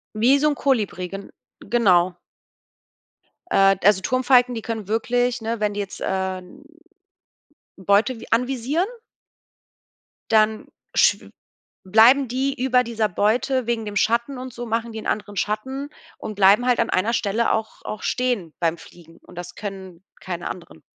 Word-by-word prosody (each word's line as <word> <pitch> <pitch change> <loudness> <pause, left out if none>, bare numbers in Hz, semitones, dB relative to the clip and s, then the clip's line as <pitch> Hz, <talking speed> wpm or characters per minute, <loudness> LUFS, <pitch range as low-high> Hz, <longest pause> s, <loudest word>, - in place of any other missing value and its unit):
Wie 255 +6 +4
so 300 - +3
'n - - -1
Kolibri, 210 -9 -1
gen 195 +2 -8 0.3
genau. 185 -6 +2 1.3
Äh, 195 - +4
also, 200 -2 +5
Turmfalken, 250 -1 +3
die 225 - -5
können 220 -3 -5
wirklich, 245 +2 0
ne 225 0 -3
wenn 210 -1 0
die 205 - -3
jetzt, 200 -2 -6
äh, 190 -1 -2
n 185 +11 -15 1.1
Beute 200 +6 +1
vi - - -10
anvisieren 260 +8 0 1.4
dann 220 0 +2 0.3
schw - - +2 0.5
bleiben 235 +7 +5
die 265 +2 -2
über 250 -1 +3
dieser 225 -2 -1
Beute 230 +6 0
wegen 230 -2 -1
dem 205 - -6
Schatten 235 +6 +1
und 255 -1 -7
so 240 0 -7
machen 230 +1 -2
die 220 0 -7
anderen 205 -1 -3
Schatten 265 +8 -3 0.3
und 215 - -6
bleiben 200 +5 +5
halt 250 -1 +3
an 230 - +1
einer 215 +6 +1
Stelle 230 +1 0
auch 220 0 -3
auch 215 - -6
stehen 240 -11 -1
beim 170 -1 +1
Fliegen 165 0 -16
und 180 - -17
das 175 0 -8
können 190 -3 -8 0.2
keine 175 -2 -5
anderen. 125 - -10
220 Hz, 150 wpm, -22 LUFS, 195-245 Hz, 1.4 s, also